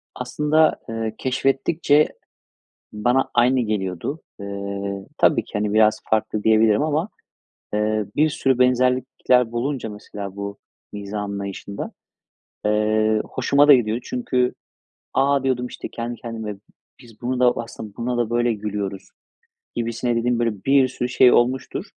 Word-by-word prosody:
Aslında, 150 +5 +2
eee, 115 -1 -3
keşfettikçe 135 +3 +2 0.9
bana 120 +5 +1
aynı 125 +2 +4
geliyordu. 105 - -3 0.2
Eee, 100 0 -5
tabii - - +3
ki - - -18
hani 105 0 -1
biraz 110 0 +4
farklı 110 -1 0
diyebilirim 110 +2 +4
ama, 155 +6 0 0.7
eee, 105 0 +1
bir 155 +1 +4
sürü 135 -4 +1
benzerlikler 125 -1 +2
bulunca 125 0 -2
mesela 100 -1 -8
bu 100 0 -5 0.3
mizah 105 0 -5
anlayışında, 100 0 -5 0.7
eee, 110 0 +2
hoşuma 145 +1 +2
da 145 - +10
gidiyordu. 120 -1 +2
Çünkü 125 0 0 0.6
a, 140 0 +2
diyordum 125 -2 0
işte - - -7
kendi 120 +1 -5
kendime 110 -3 -5 0.5
biz 115 -3 -17
buna 125 +1 -2
da 125 -1 +5
aslında 110 -3 -7
buna 120 +1 -2
da 120 -2 0
böyle 120 0 +1
gülüyoruz 100 -2 -4 0.7
gibisine 120 +1 -1
dediğim 120 +1 +1
böyle 115 -5 -1
bir 135 -1 +5
sürü 125 -1 -3
şey 125 0 +6
olmuştur. 125 +2 +1
115 Hz, 130 wpm, -22 LUFS, 105-130 Hz, 0.9 s, da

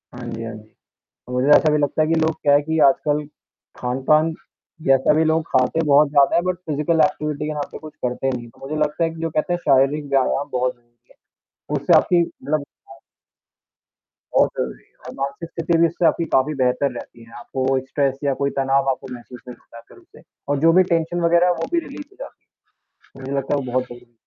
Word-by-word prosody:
हाँ 120 -1 -8
जी, 115 0 -6
हाँ 115 0 -6
जी। 110 0 -15 0.6
मुझे 125 +2 0
ऐसा 155 - +2
भी 150 - +3
लगता 145 +1 0
है 155 - +2
कि 165 - +1
लोग 160 0 +2
क्या 145 -1 +3
है 145 - +5
कि 160 +2 -2
आजकल 150 +2 +1 0.6
खान-पान, 145 +6 +1 0.5
जैसा 135 +2 +4
भी 155 +1 +3
लोग 160 0 +1
खाते 130 +4 +1
हैं 165 - 0
बहुत 145 +1 +5
ज़्यादा 140 -1 +3
है, 170 - +3
बट 185 0 -1
फ़िज़िकल 155 +2 +1
एक्टिविटी 150 -1 -3
के 155 - -3
नाम 145 -1 -4
पे - - -8
कुछ 155 -1 -11
करते 125 +2 -1
नहीं 125 -2 -4
है। 120 - -12
तो, - - -23
मुझे 155 - -4
लगता 150 +3 -1
है 165 - +1
कि 165 0 -9
जो 165 - -1
कहते 160 +3 -1
हैं 175 - -1
शारीरिक 140 +2 +3
व्यायाम 135 +1 +1
बहुत 125 0 -1
ज़रूरी 120 0 -34
है, - - -23 0.6
उससे - - +1
आपकी 175 -1 +2
मतलब 155 -2 -3
हेल्थ 135 -1 -16 1.4
बहुत - - +4
ज़रूरी - - -4
है - - -35
और - - -8
मानसिक 140 +5 -5
स्थिति 165 0 0
भी 170 0 +4
उससे 170 +1 -2
आपकी 170 - +2
काफ़ी 135 +3 +2
बेहतर 125 +2 +1
रहती 120 -1 -10
है। 115 0 -17
आपको 130 +2 -4 0.2
स्ट्रेस 135 0 -1
या 140 -1 +1
कोई 140 - +2
तनाव 135 0 +1
आपको 130 0 -4
महसूस 125 0 -11
नहीं 125 - -9
होता 115 0 -14
फिर - - -18
उससे - - -19 0.3
और 145 -1 +1
जो 165 - +6
भी - - +6
टेंशन 165 +1 -1
वगैरह 170 +1 +4
वो - - -2
भी 340 - +3
रिलीज़ 290 +1 -9
हो 395 - -21
जाती - - -11 0.5
है। 135 - -18
मुझे 135 +1 -7
लगता 135 +2 -2
है 140 - -1
वो 125 -2 -6
बहुत 130 0 0
सही 120 0 -11
है। 120 -1 -25
140 Hz, 230 wpm, -21 LUFS, 130-160 Hz, 1.4 s, जो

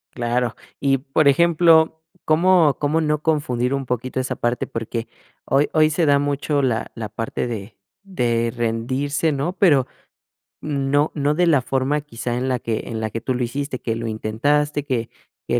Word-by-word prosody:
Claro 120 -1 -1 0.2
y, 135 -1 +2
por 135 +3 +1
ejemplo, 160 +1 +4 0.2
¿cómo 165 -3 +4
cómo 150 +2 +1
no 150 -1 0
confundir 140 -5 0
un 135 -1 -2
poquito 125 +1 -3
esa 130 0 -2
parte? 120 +1 -1
Porque 115 0 -4 0.4
hoy 140 +2 +2
hoy 155 -1 +4
se 165 +2 +1
da 145 -1 +4
mucho 145 0 0
la 120 -4 -1
la 110 -2 -5
parte 115 +2 -3
de 110 -2 -6 0.3
de 120 -11 0
rendirse, 130 +7 -1
¿no? 145 +5 -2
Pero 155 -9 +4 0.7
no 145 0 0
no 145 0 +1
de 175 +2 +2
la 145 -6 +4
forma 135 +3 0
quizá 120 -4 -5
en 130 +2 -1
la 125 - 0
que 110 -1 -3
en 110 -1 -4
la 110 - -2
que 115 +2 -5
tú 130 - -1
lo 125 0 -1
hiciste, 135 +2 -3
que 115 - -2
lo 115 0 -4
intentaste, 145 +7 0
que 120 -5 -2 0.4
que - - +1
135 Hz, 175 wpm, -21 LUFS, 120-150 Hz, 0.7 s, ejemplo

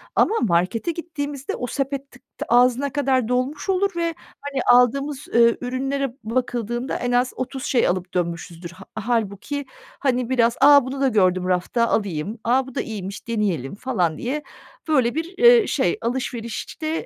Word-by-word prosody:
ama 440 - +3
markete 190 - +1
gittiğimizde 290 -5 -5
o 245 - -4
sepet 275 +2 -3
tık 245 - -17 0.3
ağzına 250 +3 +3
kadar 265 -4 +1
dolmuş 255 - -2
olur 390 +1 +2
ve, 335 -1 -1 0.3
hani, 280 -2 -3
aldığımız, 275 +4 +2
eee, 235 0 +5
ürünlere 265 +1 -2
bakıldığında 240 +1 -2
en 245 - -2
az 245 +1 +2
30 260 0 -5
şey 255 - +2
alıp 180 0 -2
dönmüşüzdür. 170 -1 -3
Hâ 185 +2 -13 0.2
hâlbuki, 235 +5 -1 0.3
hani, 255 -3 0
biraz, 240 -2 +2
"A, 285 -3 +7
bunu 270 +1 -5
da 275 - +4
gördüm 185 -6 +2
rafta 185 +6 +1
alayım. 200 +1 -2
A, 255 +3 +2
bu 265 - -11
da - - 0
iyiymiş, 200 -2 -7
deneyelim." 200 - -1
falan 180 -9 -1
diye 285 +5 -3 0.4
böyle 260 -6 +2
bir, 330 +4 -4 0.2
ııı, 435 - -1
şey. - - +1
Alışverişte 250 +6 -3
245 Hz, 155 wpm, -22 LUFS, 220-275 Hz, 0.4 s, A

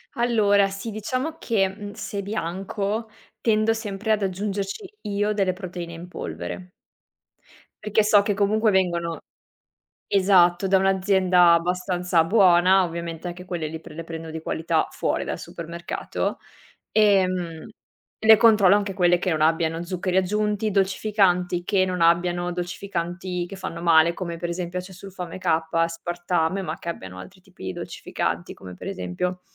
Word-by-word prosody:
Allora 210 -5 +3
sì, 195 +4 -6
diciamo 255 +9 -3
che, 200 -5 +1
mhmm, 205 +1 -8
se 200 -1 -5
bianco 200 +3 -3 0.3
tendo 220 0 +2
sempre 220 -1 -3
ad 215 -2 +2
aggiungerci 200 - -4
io 205 0 -1
delle 195 -3 +1
proteine 180 -2 -7
in 170 +2 -9
polvere 180 0 -7 1.1
perché 210 0 +2
so 210 -1 +5
che 205 - 0
comunque 210 +2 +2
vengono 170 -3 0 0.9
esatto, 185 -2 +4
da 190 - +4
un'azienda 190 -2 +4
abbastanza 180 0 +1
buona, 185 -1 +5
ovviamente 170 0 -5
anche 175 +1 -7
quelle 170 -4 -3
lì 160 +1 -6
pre 150 - -12
le 165 - -6
prendo 165 0 -7
di 160 - -6
qualità 160 0 0
fuori - - -1
dal - - -4
supermercato, 170 +1 -4 0.5
ehm, 185 -6 +2 0.6
le 220 -1 +8
controllo 210 -4 +6
anche 205 -1 -1
quelle 175 -2 +3
che 185 -1 -1
non 155 - 0
abbiano 165 +1 +1
zuccheri 180 +1 -3
aggiunti, 210 +2 0
dolcificanti, 190 -2 +1
che 190 0 +2
non 180 -1 -3
abbiano 175 +1 +2
dolcificanti 180 0 -4
che 195 - -8
fanno 175 -3 -6
male, 170 0 +5
come 170 -2 -5
per 175 - -4
esempio 175 +1 -3
acesulfame 185 -1 -8
K, - - -15 0.3
aspartame, 175 +2 -1
ma 165 -3 -4
che - - -11
abbiano 95 - -7
altri 185 - -12
tipi 95 - -13
di 95 - -3
dolcificanti, - - -4
come 90 -1 -11
per - - -9
esempio 180 - -3
185 Hz, 145 wpm, -24 LUFS, 170-200 Hz, 1.1 s, le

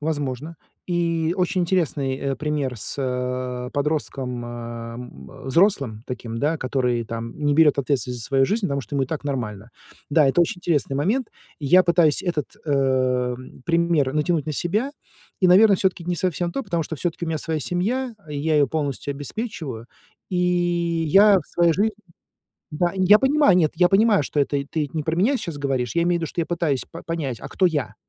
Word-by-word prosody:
Возможно. 145 0 -3 0.3
И 170 -2 0
очень 185 +1 0
интересный, 155 -7 0
э, 140 0 -2
пример 145 -4 -2
с, 105 - -5
э, 125 -1 -3
подростком, 140 -4 -2
э, - - -7 0.5
м, 125 +2 -11
взрослым 135 - +2
таким, 115 -2 -5 0.2
который 125 -3 0
там 115 +1 -6
не 145 -1 +1
берет 150 -2 +5
ответственность 125 -3 -1
за 110 - -4
свою 135 -1 +3
жизнь, 215 +6 -1
потому 140 -4 -1
что 130 - -9
ему 135 - +2
и - - -10
так 155 +1 -4
нормально. 115 -6 -4 0.4
Да, 150 0 +4
это 135 +6 +3
очень 170 +1 +1
интересный 150 -6 0
момент. 215 - 0 0.3
Я 175 +6 +5
пытаюсь 170 -4 +3
этот, 170 -6 -3
э, 130 -3 +1 0.3
пример 165 -5 +2
натянуть 155 0 0
на 155 - -2
себя 210 - -1 0.5
и, 185 - +5
наверное, 200 +3 +6
всё-таки 185 -2 0
не 175 0 -1
совсем 175 0 -1
то, 270 - -3
потому 170 -5 -1
что 160 +1 -6
всё-таки 170 +2 -3
у - - -4
меня 160 -1 -1
своя 160 0 -2
семья, 230 - -1
и 145 -1 -4
я 155 +2 0
ее 145 - +4
полностью 145 -1 -3
обеспечиваю, 145 - -6 0.4
и 180 - -1
я 175 +2 +3
в 160 - -9
своей 170 -1 +2
жизни 210 +6 +1 0.8
Да. 175 +3 0
Я 190 +2 +6
понимаю, 270 -6 +4
нет, 155 -4 +3
я 180 -1 +4
понимаю, 210 0 +4
что 145 +1 -2
это 140 0 0
ты 150 -3 -2
не 155 - -1
про 160 +2 -2
меня 215 +11 +2
сейчас 165 -8 -5
говоришь, 135 -4 -2
я 170 - +3
имею 175 0 +1
в - - -8
виду, 165 - -2
что - - -5
я 165 - +1
пытаюсь 160 -6 -1
па 165 - -8
понять, 145 -8 -4
а - - -6
кто 190 - +1
я, 150 -9 -1
155 Hz, 190 wpm, -23 LUFS, 135-175 Hz, 0.8 s, наверное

